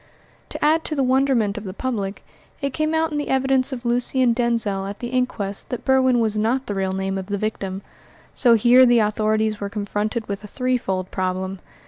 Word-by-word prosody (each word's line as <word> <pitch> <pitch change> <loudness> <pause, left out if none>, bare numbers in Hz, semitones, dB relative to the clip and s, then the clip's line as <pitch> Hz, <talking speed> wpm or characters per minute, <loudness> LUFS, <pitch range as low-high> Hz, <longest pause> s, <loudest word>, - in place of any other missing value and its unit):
To - - -3
add 320 +2 +3
to 310 - -3
the 275 - +1
wonderment 255 -6 +2
of - - -11
the 190 -2 -7
public, 210 -6 -3 0.3
it 280 -1 -3
came 310 0 0
out 320 0 +1
in 295 - -1
the 290 - -4
evidence 265 0 +2
of 250 -2 -6
Lucian 245 +1 +2
Denzil 230 -5 0
at 200 +1 -6
the 240 - -5
inquest 240 -6 -2
that 250 - -5
Berwin 260 -2 +3
was 220 -2 +1
not 245 +5 0
the 205 - -3
real 190 -1 -1
name 190 0 -2
of 190 - -7
the 205 0 -2
victim; 195 -2 -4 0.5
so 240 -3 +4
here 245 +3 +6
the 240 -1 +5
authorities 215 0 +1
were 200 - -3
confronted 210 +2 -3
with 200 0 -5
a - - -8
three 255 +3 -1
fold 185 -3 -3
problem. 185 0 -2
230 Hz, 205 wpm, -22 LUFS, 200-255 Hz, 0.5 s, here